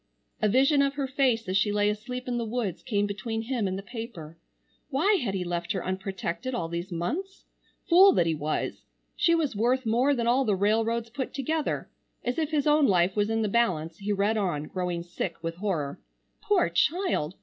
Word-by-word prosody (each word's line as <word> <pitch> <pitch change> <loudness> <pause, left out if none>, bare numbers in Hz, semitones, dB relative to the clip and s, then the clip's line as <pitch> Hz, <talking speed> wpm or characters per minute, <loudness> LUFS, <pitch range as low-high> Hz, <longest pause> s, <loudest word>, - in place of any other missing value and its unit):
A 215 - +3
vision 275 +5 +4
of 275 0 +1
her 280 -1 -1
face 260 -5 +1
as 185 - -1
she 205 +1 +2
lay 205 0 +2
asleep 250 +5 -3
in 245 -1 -1
the - - -1
woods 220 -6 -3
came 205 -4 0
between 225 +3 -3
him 235 -4 -1
and 190 0 -2
the 195 - -6
paper. 205 -9 -8 0.5
Why 365 +9 +3
had 195 -5 -2
he 185 - -1
left 175 -1 -2
her 190 - -3
unprotected 190 +5 -3
all 165 - -2
these 170 +3 -4
months? 325 - -4 0.4
Fool 375 +3 +8
that 170 - +3
he 165 - +1
was! 150 0 -3 0.3
She 335 -1 +3
was 305 -8 0
worth 245 +4 +1
more 250 +6 +3
than 235 -2 -1
all 250 +3 +3
the 210 -5 +1
railroads 225 +3 +1
put 260 +2 -4
together. 305 +3 -1 0.4
As 245 +5 -1
if 310 -2 0
his 300 -3 0
own 300 -1 +4
life 180 0 +3
was 205 0 +1
in 225 0 +1
the - - +1
balance, 175 -8 0
he 205 +1 -2
read 205 +2 +1
on, 175 -8 -1
growing 175 +1 -3
sick 175 0 -4
with 165 0 -4
horror. 170 -8 -2 0.4
Poor 405 -4 +2
child! 325 - 0
220 Hz, 205 wpm, -27 LUFS, 185-260 Hz, 0.5 s, Fool